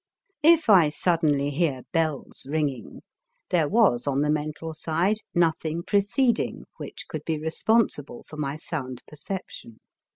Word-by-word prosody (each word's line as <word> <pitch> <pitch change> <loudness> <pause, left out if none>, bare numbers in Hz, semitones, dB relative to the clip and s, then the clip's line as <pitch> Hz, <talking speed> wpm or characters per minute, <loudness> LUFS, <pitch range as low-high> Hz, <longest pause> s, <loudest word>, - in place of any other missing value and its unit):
If 325 0 +5
I 185 -8 +7
suddenly 150 -3 +1
hear 140 -4 0
bells 155 -5 -2
ringing, 145 -5 -2 0.5
there 160 -5 +2
was 195 - +3
on 140 0 +1
the 150 0 +2
mental 155 +2 -3
side 165 +6 0 0.2
nothing 165 -1 +1
preceding 220 +6 +1
which - - -8
could - - -6
be 160 -1 -1
responsible 160 - 0
for 155 - -12
my 145 -1 -2
sound 130 -6 -5
perception. 150 - -8
155 Hz, 130 wpm, -25 LUFS, 145-180 Hz, 0.5 s, I